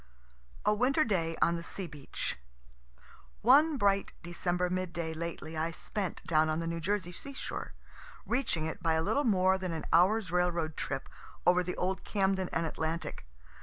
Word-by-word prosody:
A 210 Hz, -, +5 dB
WINTER 260 Hz, +8 st, +3 dB
DAY 165 Hz, -, 0 dB
ON 170 Hz, 0 st, +2 dB
THE -, -, -5 dB
SEA 190 Hz, +3 st, -4 dB
BEACH 150 Hz, -5 st, -4 dB, 1.1 s
One 290 Hz, +6 st, +6 dB
bright 200 Hz, -3 st, +2 dB
December 175 Hz, +1 st, -1 dB
mid 185 Hz, -1 st, -2 dB
day 165 Hz, -2 st, -3 dB
lately 165 Hz, -1 st, -5 dB
I 160 Hz, +1 st, 0 dB
spent 190 Hz, +3 st, -4 dB
down 155 Hz, -1 st, +3 dB
on 155 Hz, +1 st, 0 dB
the 165 Hz, -, -2 dB
New 165 Hz, 0 st, -2 dB
Jersey 185 Hz, +1 st, -1 dB
sea 275 Hz, +10 st, -8 dB
shore, -, -, -5 dB, 0.5 s
reaching 240 Hz, -, 0 dB
it 160 Hz, +4 st, -4 dB
by 165 Hz, -2 st, +2 dB
a 160 Hz, 0 st, +2 dB
little 285 Hz, -, +1 dB
more 190 Hz, -3 st, +4 dB
than 185 Hz, -2 st, -3 dB
an 160 Hz, -, -4 dB
hour's 185 Hz, +2 st, +4 dB
railroad 175 Hz, -3 st, +1 dB
trip 135 Hz, -1 st, -3 dB, 0.4 s
over 180 Hz, 0 st, +5 dB
the 180 Hz, 0 st, -4 dB
old 185 Hz, +1 st, -1 dB
Camden 190 Hz, -2 st, +1 dB
and 165 Hz, -, 0 dB
Atlantic. 160 Hz, -, -3 dB
180 Hz, 170 wpm, -31 LUFS, 165-195 Hz, 1.1 s, One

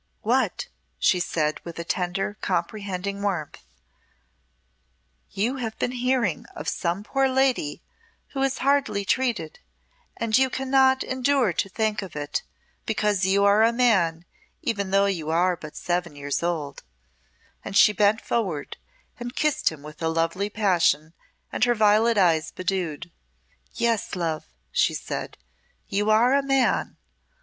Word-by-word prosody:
"What," -, -, +1 dB, 0.3 s
she 185 Hz, -, +3 dB
said, 155 Hz, -3 st, -1 dB
with 170 Hz, -, -8 dB
a 170 Hz, -, -3 dB
tender 180 Hz, +4 st, -2 dB
comprehending 200 Hz, -2 st, -2 dB
warmth, 185 Hz, -7 st, -3 dB, 1.7 s
"you 235 Hz, +7 st, -1 dB
have 225 Hz, -3 st, -4 dB
been 245 Hz, -, -1 dB
hearing 250 Hz, -, 0 dB
of 150 Hz, -, -7 dB
some 175 Hz, +3 st, -1 dB
poor 270 Hz, +4 st, +1 dB
lady 260 Hz, -, +1 dB, 0.5 s
who 270 Hz, -, -4 dB
is 270 Hz, -1 st, +1 dB
hardly 275 Hz, -8 st, +2 dB
treated, 235 Hz, -10 st, -1 dB, 0.6 s
and 230 Hz, -1 st, 0 dB
you 265 Hz, +1 st, +4 dB
cannot 265 Hz, 0 st, +3 dB
endure 260 Hz, -5 st, +1 dB
to 195 Hz, -, -1 dB
think 215 Hz, +1 st, -1 dB
of 190 Hz, -6 st, -9 dB
it, 145 Hz, -2 st, -2 dB, 0.5 s
because 210 Hz, -3 st, +1 dB
you 200 Hz, +1 st, +3 dB
are 200 Hz, +1 st, +5 dB
a 225 Hz, +1 st, +5 dB
man 190 Hz, -9 st, +2 dB, 0.4 s
even 200 Hz, -4 st, -1 dB
though 195 Hz, +1 st, +4 dB
you 170 Hz, -6 st, -2 dB
are 175 Hz, +3 st, +2 dB
but 155 Hz, -3 st, -11 dB
seven 175 Hz, -3 st, -2 dB
years 145 Hz, 0 st, -3 dB
old;" 165 Hz, -4 st, -3 dB, 0.8 s
and 195 Hz, -, -2 dB
she 210 Hz, -, +7 dB
bent 210 Hz, +2 st, +3 dB
forward 180 Hz, -12 st, -2 dB, 0.4 s
and 240 Hz, +1 st, -6 dB
kissed 300 Hz, -, +1 dB
him 150 Hz, -3 st, -11 dB
with 150 Hz, +1 st, -11 dB
a 165 Hz, -, +1 dB
lovely 165 Hz, +5 st, 0 dB
passion 175 Hz, -7 st, +1 dB, 0.4 s
and 220 Hz, -, +2 dB
her 240 Hz, 0 st, +2 dB
violet 215 Hz, +1 st, +4 dB
eyes 165 Hz, -5 st, +3 dB
bedewed. 175 Hz, -3 st, -3 dB, 0.6 s
"Yes, 230 Hz, -3 st, 0 dB
love," 165 Hz, -3 st, -2 dB, 0.3 s
she -, -, +2 dB
said, -, -, -5 dB, 0.5 s
"you 205 Hz, +2 st, 0 dB
are 230 Hz, +4 st, +5 dB
a 280 Hz, -, +4 dB
Man. 270 Hz, -2 st, +1 dB
200 Hz, 140 wpm, -25 LUFS, 170-235 Hz, 1.7 s, she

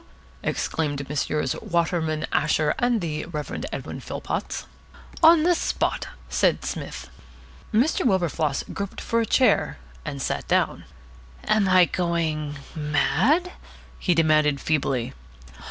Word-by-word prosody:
exclaimed 145 Hz, -3 st, -2 dB
Messrs. 150 Hz, -2 st, 0 dB
Waterman, 165 Hz, -2 st, 0 dB
Asher, 150 Hz, 0 st, +2 dB
and 245 Hz, -3 st, +2 dB
the 155 Hz, -3 st, -3 dB
Reverend 150 Hz, -3 st, -5 dB
Edwin -, -, -5 dB
Philpotts. -, -, -4 dB, 0.6 s
"On 325 Hz, -1 st, +7 dB
the 350 Hz, +1 st, +4 dB
spot!" 340 Hz, -, -1 dB, 0.2 s
said -, -, +1 dB
Psmith. -, -, -5 dB, 0.6 s
Mr. 245 Hz, +8 st, +2 dB
Wilberfloss 170 Hz, -, +1 dB
groped 200 Hz, -1 st, -5 dB
for 230 Hz, 0 st, 0 dB
a 225 Hz, -, -1 dB
chair 255 Hz, -, +3 dB, 0.3 s
and 140 Hz, -, -5 dB
sat -, -, -2 dB
down. -, -, +1 dB, 0.6 s
"Am 210 Hz, -2 st, +2 dB
I 185 Hz, -1 st, +7 dB
going 160 Hz, -4 st, -1 dB, 0.2 s
mad?" 225 Hz, -, +2 dB, 0.5 s
he 180 Hz, -, +2 dB
demanded 155 Hz, -3 st, +3 dB
feebly. 135 Hz, -6 st, 0 dB
165 Hz, 115 wpm, -24 LUFS, 150-215 Hz, 0.6 s, On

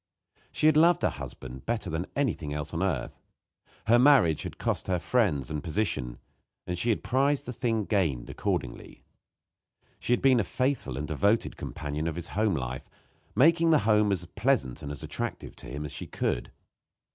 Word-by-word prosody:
She -, -, -1 dB
had 155 Hz, -1 st, +6 dB
loved 170 Hz, +2 st, +5 dB
her -, -, +3 dB
husband 65 Hz, 0 st, -9 dB
better 115 Hz, -4 st, -1 dB
than 80 Hz, +1 st, -3 dB
anything 100 Hz, -, -1 dB
else 75 Hz, +2 st, -5 dB
on 85 Hz, -, -2 dB
earth. 95 Hz, 0 st, -2 dB, 0.7 s
Her 120 Hz, +2 st, +5 dB
marriage 125 Hz, -, +5 dB
had -, -, -6 dB
cost -, -, -2 dB
her 95 Hz, -1 st, +1 dB
friends 85 Hz, -, +1 dB
and 75 Hz, -2 st, -3 dB
position, 80 Hz, -, -2 dB, 0.5 s
and 90 Hz, -, -3 dB
she 100 Hz, +7 st, -1 dB
had 110 Hz, -, +1 dB
prized 140 Hz, +3 st, +1 dB
the 125 Hz, -, -5 dB
thing 115 Hz, -3 st, -1 dB
gained 80 Hz, -, 0 dB
accordingly. -, -, -4 dB, 1.0 s
She -, -, -3 dB
had 125 Hz, -, +3 dB
been 130 Hz, -3 st, +5 dB
a -, -, +2 dB
faithful 130 Hz, -, -1 dB
and 75 Hz, +2 st, -3 dB
devoted 100 Hz, +9 st, +1 dB
companion 75 Hz, +2 st, -4 dB
of 80 Hz, -, -2 dB
his 85 Hz, -, -5 dB
home 105 Hz, 0 st, +1 dB
life, 65 Hz, -1 st, -5 dB, 0.5 s
making 165 Hz, +7 st, +5 dB
that 160 Hz, -, +5 dB
home 105 Hz, -1 st, +4 dB
as 90 Hz, -3 st, -1 dB
pleasant 95 Hz, -, 0 dB
and 70 Hz, -, -5 dB
attractive 70 Hz, -, -5 dB
to -, -, -11 dB
him 70 Hz, +5 st, -5 dB
as 75 Hz, -, -6 dB
she -, -, -7 dB
could. -, -, -2 dB
95 Hz, 180 wpm, -28 LUFS, 75-125 Hz, 1.0 s, had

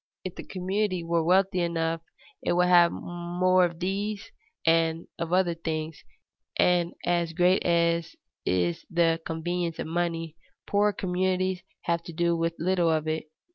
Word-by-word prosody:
If 185 Hz, -, -5 dB
the -, -, -8 dB
community 185 Hz, 0 st, -1 dB
were 165 Hz, 0 st, +1 dB
wealthy 185 Hz, +2 st, +3 dB
enough 165 Hz, -1 st, -1 dB, 0.4 s
it -, -, 0 dB
would 180 Hz, +1 st, +3 dB
have 175 Hz, -1 st, +6 dB
more 180 Hz, +1 st, +1 dB
of 170 Hz, -1 st, -5 dB
these 200 Hz, +3 st, -3 dB, 0.3 s
and 165 Hz, 0 st, +2 dB
of 170 Hz, 0 st, -3 dB
other 180 Hz, -1 st, +3 dB
things, 160 Hz, -2 st, -4 dB, 0.5 s
and 175 Hz, -1 st, +3 dB, 0.4 s
great 180 Hz, +2 st, +3 dB
as 170 Hz, -1 st, +1 dB, 0.3 s
is 90 Hz, -2 st, 0 dB
the 165 Hz, -1 st, +2 dB
convenience 170 Hz, +1 st, -2 dB
of -, -, -3 dB
money, 165 Hz, -1 st, -2 dB, 0.3 s
poorer 205 Hz, +1 st, +2 dB
communities 185 Hz, -1 st, -1 dB, 0.2 s
have 170 Hz, 0 st, 0 dB
to 170 Hz, -, -8 dB
do 170 Hz, +1 st, +1 dB
with 165 Hz, 0 st, -1 dB
little 175 Hz, -1 st, +2 dB
of 155 Hz, -1 st, 0 dB
it. 155 Hz, 0 st, -2 dB
170 Hz, 145 wpm, -27 LUFS, 165-185 Hz, 0.5 s, have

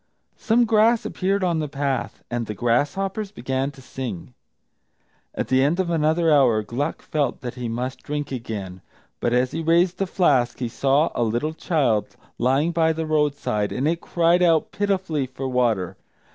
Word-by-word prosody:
Some 235 Hz, +2 st, +3 dB
grass 225 Hz, +1 st, +3 dB
appeared 195 Hz, +1 st, -1 dB
on 170 Hz, -3 st, +1 dB
the 155 Hz, -, -2 dB
path, 140 Hz, -3 st, -3 dB
and 120 Hz, -2 st, -2 dB
the 105 Hz, -, -5 dB
grasshoppers 190 Hz, -, 0 dB
began 130 Hz, -4 st, -2 dB
to 135 Hz, -2 st, -14 dB
sing. 125 Hz, -4 st, -6 dB, 1.0 s
At -, -, -3 dB
the 130 Hz, 0 st, +4 dB
end 155 Hz, +6 st, +1 dB
of 180 Hz, -2 st, 0 dB
another 160 Hz, 0 st, +2 dB
hour, 120 Hz, -7 st, +4 dB
Gluck 125 Hz, +7 st, -3 dB
felt 150 Hz, -3 st, -1 dB
that 125 Hz, -3 st, -5 dB
he 125 Hz, -2 st, -5 dB
must 125 Hz, +3 st, -4 dB
drink 145 Hz, -1 st, -4 dB
again. 105 Hz, -7 st, -5 dB, 0.4 s
But, 120 Hz, -, 0 dB
as 125 Hz, +1 st, +2 dB
he 165 Hz, -, -3 dB
raised 170 Hz, +3 st, +2 dB
the 195 Hz, -, 0 dB
flask, 135 Hz, -11 st, +2 dB
he 120 Hz, -2 st, -3 dB
saw 140 Hz, +6 st, +2 dB
a -, -, -2 dB
little 120 Hz, +7 st, 0 dB
child 140 Hz, -, 0 dB, 0.2 s
lying 135 Hz, +7 st, +2 dB
by 160 Hz, -1 st, +2 dB
the 160 Hz, 0 st, -3 dB
roadside, 145 Hz, -9 st, 0 dB
and 135 Hz, +4 st, -1 dB
it 165 Hz, +1 st, 0 dB
cried 170 Hz, +1 st, +2 dB
out 165 Hz, -3 st, +3 dB
pitifully 190 Hz, -9 st, -1 dB
for 130 Hz, +1 st, -5 dB
water. 120 Hz, -8 st, 0 dB
145 Hz, 175 wpm, -23 LUFS, 125-170 Hz, 1.0 s, the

